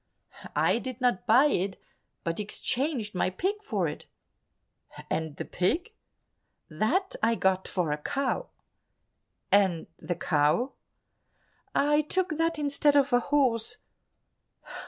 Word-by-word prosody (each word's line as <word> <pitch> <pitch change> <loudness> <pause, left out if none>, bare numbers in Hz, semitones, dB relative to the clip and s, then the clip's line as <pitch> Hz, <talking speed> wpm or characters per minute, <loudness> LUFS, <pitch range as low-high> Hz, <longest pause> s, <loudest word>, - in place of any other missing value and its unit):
"I - - +3
did 255 +1 -6
not 245 -8 +1
buy 250 +6 +6
it, 195 -9 0 0.4
but 165 +2 -2
exchanged 240 +2 -2
my 180 - +1
pig 385 - -2
for 420 - -1
it." - - -7 1.0
"And 160 -2 -2
the - - -5
pig?" 335 - -1 0.8
"That 270 - 0
I 230 +1 +3
got 190 -3 +1
for 175 -5 -1
a 150 - -1
cow." 275 - -1 1.0
"And 190 -5 +3
the 175 - -3
cow?" 165 - +1 1.0
"I 295 +1 +4
took 370 +5 -1
that 330 0 +1
instead 290 0 +2
of 280 -2 +3
a 245 - +6
horse." 245 -4 +1
245 Hz, 120 wpm, -28 LUFS, 185-295 Hz, 1.0 s, buy